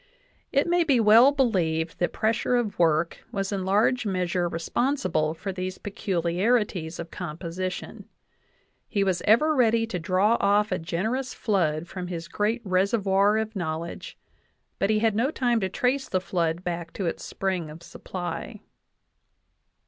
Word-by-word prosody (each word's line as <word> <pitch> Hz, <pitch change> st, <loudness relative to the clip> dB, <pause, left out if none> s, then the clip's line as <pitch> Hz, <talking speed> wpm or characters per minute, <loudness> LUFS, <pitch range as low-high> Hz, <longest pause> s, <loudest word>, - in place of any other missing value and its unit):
It 280 Hz, 0 st, +3 dB
may 345 Hz, 0 st, +3 dB
be 275 Hz, -6 st, +3 dB
well 225 Hz, +5 st, +7 dB
believed 175 Hz, -, 0 dB
that 175 Hz, -, +1 dB
pres 220 Hz, +1 st, +1 dB
sure 250 Hz, -, 0 dB
of 230 Hz, -6 st, -1 dB
work 165 Hz, 0 st, +2 dB
was 195 Hz, 0 st, -2 dB
in 195 Hz, -2 st, -2 dB
large 215 Hz, +6 st, +2 dB
measure 180 Hz, -3 st, -1 dB
responsible 165 Hz, -, 0 dB
for 190 Hz, +4 st, -5 dB
these 185 Hz, 0 st, -4 dB
pe 205 Hz, -, -7 dB
culiarities 180 Hz, -1 st, 0 dB
of 170 Hz, -1 st, -7 dB
composition. 180 Hz, +2 st, -5 dB, 0.8 s
'He 200 Hz, -3 st, 0 dB
was 185 Hz, -2 st, 0 dB
ever 270 Hz, +9 st, +5 dB
ready 230 Hz, -4 st, +3 dB
to 195 Hz, -6 st, -4 dB
draw 190 Hz, +7 st, +2 dB
off 210 Hz, +2 st, +2 dB
a -, -, 0 dB
generous 220 Hz, +11 st, -2 dB
flood 170 Hz, -6 st, 0 dB
from 180 Hz, 0 st, -6 dB
his 170 Hz, -2 st, -5 dB
great 215 Hz, +6 st, -1 dB
reservoir 195 Hz, +2 st, +2 dB
of 220 Hz, 0 st, -3 dB
knowledge, 170 Hz, -2 st, -5 dB, 0.6 s
but 195 Hz, -, +1 dB
he 215 Hz, -, +3 dB
had 220 Hz, -1 st, +2 dB
no 235 Hz, +5 st, +2 dB
time 245 Hz, -6 st, +1 dB
to 190 Hz, -3 st, -1 dB
trace 260 Hz, +7 st, 0 dB
the 185 Hz, -, +1 dB
flood 170 Hz, -2 st, -1 dB
back 170 Hz, -2 st, -4 dB
to 195 Hz, -, -3 dB
its 165 Hz, -, -3 dB
spring 185 Hz, -5 st, -2 dB
of 160 Hz, +3 st, -11 dB
supply.' 175 Hz, 0 st, -6 dB
190 Hz, 155 wpm, -26 LUFS, 170-225 Hz, 0.8 s, well